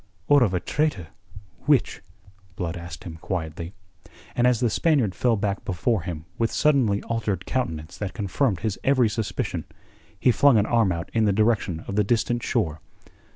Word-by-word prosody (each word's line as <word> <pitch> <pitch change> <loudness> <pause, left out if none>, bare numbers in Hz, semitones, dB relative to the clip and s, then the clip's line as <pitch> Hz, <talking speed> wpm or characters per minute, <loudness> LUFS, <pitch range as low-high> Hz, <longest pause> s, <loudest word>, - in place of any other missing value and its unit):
"Or 145 -1 +6
of 100 -6 +2
a - - +1
traitor 145 - -1 0.6
which?" - - +2 0.5
Blood 85 -1 -3
asked 85 -1 -8
him 80 -2 -8
quietly. 85 +1 -5 0.6
And 120 +1 +3
as 125 -3 +3
the 120 -3 +1
Spaniard 135 - +2
fell 120 +2 +2
back 100 -1 -2
before 95 +3 0
him 80 -2 -6
with 115 0 +1
suddenly 130 -9 +2
altered 110 -5 -2
countenance 80 -12 -3
that 100 -3 -4
confirmed 100 0 0
his 110 -2 -2
every 130 -4 +3
suspicion, 105 -5 -3 0.6
he 125 - +4
flung 125 +3 +5
an 105 - +3
arm 115 -5 +2
out 85 -1 -4
in 110 -1 +2
the 105 - +3
direction 100 -5 +1
of 100 - -5
the 105 - +4
distant 120 +3 0
shore. 80 -13 -1
105 Hz, 170 wpm, -24 LUFS, 90-120 Hz, 0.6 s, Or